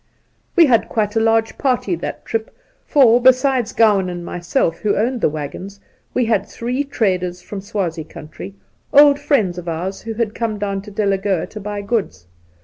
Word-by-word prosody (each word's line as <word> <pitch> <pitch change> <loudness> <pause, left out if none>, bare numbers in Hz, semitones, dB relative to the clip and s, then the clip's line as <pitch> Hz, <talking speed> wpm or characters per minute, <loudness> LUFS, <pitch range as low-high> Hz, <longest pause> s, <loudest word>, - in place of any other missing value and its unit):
We 345 -3 +7
had 240 -6 +2
quite 210 -1 -1
a - - +3
large 225 0 +1
party 250 -8 0
that - - -6
trip, 225 -1 -2 0.4
for, 245 -4 +5
besides 255 -2 +3
Gowan 205 -5 +3
and 175 -1 -6
myself, 170 -1 -1
who 210 - 0
owned 240 +3 0
the - - +3
waggons, 155 +7 -7 0.4
we 250 - +2
had 215 -3 +1
three 250 +4 -3
traders 185 -9 -1
from 200 -2 -7
Swazie 180 -5 -3
country 160 +6 -10 0.2
— - - -40
old 290 -1 +7
friends 225 - +1
of 175 -1 -6
ours 180 +4 -4
who 225 -1 -6
had 220 -2 -1
come 225 -2 -2
down 200 -1 -2
to 205 - -11
Delagoa 195 -3 0
to 215 - -7
buy 205 0 -5
goods. 200 - -2
210 Hz, 180 wpm, -19 LUFS, 185-235 Hz, 0.4 s, We